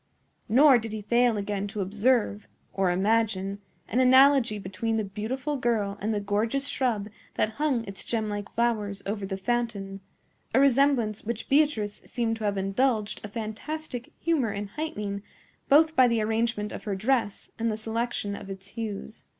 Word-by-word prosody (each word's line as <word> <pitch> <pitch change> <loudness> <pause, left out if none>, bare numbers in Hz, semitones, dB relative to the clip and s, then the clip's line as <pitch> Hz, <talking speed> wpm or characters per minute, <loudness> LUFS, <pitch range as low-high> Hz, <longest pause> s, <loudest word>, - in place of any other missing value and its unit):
Nor 265 +2 +7
did 225 -1 -6
he 215 -1 -5
fail 235 +1 +3
again 205 0 -2
to 210 +1 -6
observe, 210 +2 +1 0.3
or 195 -2 +1
imagine, 200 0 +1 0.3
an 240 - 0
analogy 260 -3 +6
between 205 +4 -2
the 220 - 0
beautiful 255 +9 -3
girl 220 -5 0
and 215 +2 0
the 210 - 0
gorgeous 220 +7 0
shrub 235 -8 -1 0.3
that 215 - +1
hung 265 -7 +1
its 195 -1 -7
gemlike 210 -3 -3
flowers 215 -4 0
over 200 -1 -3
the 190 -1 -3
fountain,—a 200 0 -3
resemblance 270 -5 +3
which 230 0 -4
Beatrice 270 -8 +2
seemed 230 -2 -1
to 220 - -4
have 200 -1 0
indulged 210 +2 0
a - - -4
fantastic 240 +5 -5
humor 295 -10 +1
in 200 0 -4
heightening, 210 -9 -4 0.5
both 315 +3 +5
by 255 -1 +6
the 235 -1 +1
arrangement 220 -1 0
of - - -8
her 205 -2 -1
dress 220 0 -1
and 230 0 +1
the 215 - -3
selection 220 -2 -2
of 200 -1 -9
its 195 0 -8
hues. 220 0 -6
220 Hz, 160 wpm, -27 LUFS, 205-245 Hz, 0.5 s, Nor